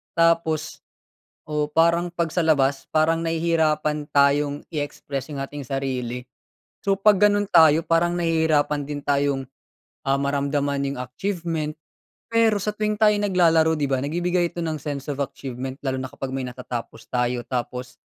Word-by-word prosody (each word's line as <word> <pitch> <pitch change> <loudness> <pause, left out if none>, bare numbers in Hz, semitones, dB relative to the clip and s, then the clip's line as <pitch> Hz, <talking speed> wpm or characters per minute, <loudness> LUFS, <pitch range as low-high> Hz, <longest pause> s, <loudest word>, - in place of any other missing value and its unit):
tapos, 165 -2 +1 0.7
oo, 150 -1 -1
parang 170 +3 +3
'pag 170 -2 -2
sa - - -1
labas, 140 -4 +2
parang 160 +1 +3
nahihirapan 160 -2 0
tayong 145 +1 +3
i-express 145 -2 -4
'yong 140 -3 -4
ating 140 -1 -7
sarili. 125 -2 -3 0.6
So, 195 -1 +1
'pag 210 0 +6
gano'n 205 -1 +3
tayo, 160 -4 +6
parang 165 +1 +2
nahihirapan 160 -4 +1
din 145 0 -5
tayong, 140 -2 0 0.6
ah, 135 - +3
maramdaman 140 0 0
'yong 140 -2 -4
achievement, 160 - -3 0.5
pero 225 -3 +3
sa 210 +2 -1
tuwing 215 0 0
tayo 210 -1 +6
naglalaro, 170 -5 +3
'di 145 -3 -1
ba, 135 - +2
nagbibigay 175 +5 0
ito 175 - -4
ng 160 -2 -2
sense 145 -1 -5
of 140 - -3
achievement. 130 -1 -5
Lalo 130 -2 -2
na 130 0 -4
kapag 135 - -5
may 130 0 -3
natatapos 125 -2 -7
tayo 125 0 0
tapos, 125 0 -4
150 Hz, 150 wpm, -23 LUFS, 135-165 Hz, 0.7 s, pag